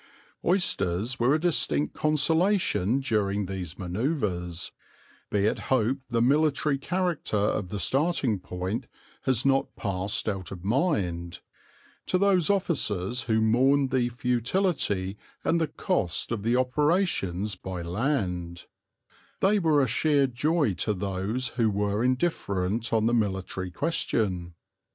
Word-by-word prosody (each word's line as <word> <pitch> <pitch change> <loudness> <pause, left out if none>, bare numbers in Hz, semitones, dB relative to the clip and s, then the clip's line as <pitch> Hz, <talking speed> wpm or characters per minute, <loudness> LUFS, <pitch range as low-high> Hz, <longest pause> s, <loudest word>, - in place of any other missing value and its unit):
Oysters 120 - 0
were 125 +5 +4
a - - +1
distinct 155 -3 +1
consolation 155 - +2
during 105 -5 0
these 95 -3 -6
manoeuvres 90 - -2 0.6
be 100 -1 +1
it 110 - +1
hoped 130 +1 +2
the 115 -1 +2
military 145 +1 +2
character 175 - -1
of 100 -2 0
the 105 - -4
starting 135 - +1
point 95 +7 -4 0.4
has 130 -2 +1
not 135 0 +1
passed 100 0 -1
out 95 -4 -3
of 90 -2 -8
mind 95 - -1 0.7
to 185 - +2
those 190 -3 +3
officers 125 - 0
who 110 0 +3
mourned 130 +5 +3
the 125 -2 +1
futility 120 - 0 0.2
and 170 0 +1
the 160 - +1
cost 150 - -1
of 115 -3 -2
the 115 +3 +1
operations 130 - +1
by 90 -1 -6
land: 90 - -2 0.7
they 205 +2 +3
were 155 -5 +3
a - - +1
sheer 140 +4 +2
joy 140 - +1
to 105 +4 -1
those 100 +6 -2
who 115 -2 +1
were 105 +2 0
indifferent 115 - 0
on 110 -1 +2
the 120 - +2
military 95 -4 -1
question. 90 - -1
115 Hz, 130 wpm, -27 LUFS, 95-145 Hz, 0.7 s, were